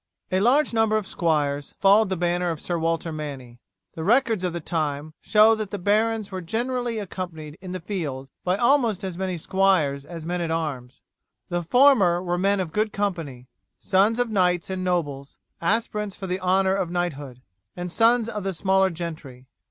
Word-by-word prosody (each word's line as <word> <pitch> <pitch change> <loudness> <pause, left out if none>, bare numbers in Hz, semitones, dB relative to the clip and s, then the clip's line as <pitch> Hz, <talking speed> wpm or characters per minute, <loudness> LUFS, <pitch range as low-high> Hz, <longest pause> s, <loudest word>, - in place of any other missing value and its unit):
A 185 - +2
large 250 +7 +3
number 225 -1 +3
of 215 - -3
squires 145 -6 -1
followed 200 +1 +5
the 190 - -1
banner 175 +1 0
of 165 -2 -3
Sir 175 +1 -3
Walter 165 0 -1
Manny. 135 -6 -7 0.3
The 160 - -6
records 225 -1 +2
of 180 - 0
the 170 - -4
time 155 -2 -3
show 215 +1 +5
that 215 -2 -3
the 205 - -4
barons 215 +2 +1
were 185 -1 -4
generally 240 +5 -2
accompanied 175 -7 -6
in 185 -1 -7
the 185 - -4
field 155 -8 -4 0.2
by 180 +1 +1
almost 235 -5 +2
as 190 -2 -4
many 185 -1 -3
squires 170 -6 +1
as 165 +1 -9
men 175 +1 -2
at 170 - -2
arms. 150 -7 -4 0.5
The 175 0 -1
former 200 - +4
were 175 -1 -2
men 200 +1 +2
of 170 -4 -3
good 215 0 0
family, 165 -11 -3 0.3
sons 200 +4 +2
of 245 -2 0
knights 180 -3 +1
and 185 -1 -3
nobles, 145 -7 -2 0.2
aspirants 210 +1 -1
for 195 - -7
the 185 0 -2
honour 190 +1 +2
of 190 -3 -1
knighthood, 145 -8 -4 0.3
and 175 0 -4
sons 230 +2 +3
of 210 -3 -4
the 195 -1 -2
smaller 190 +2 +2
gentry. 160 -7 -7
180 Hz, 185 wpm, -24 LUFS, 165-205 Hz, 0.5 s, followed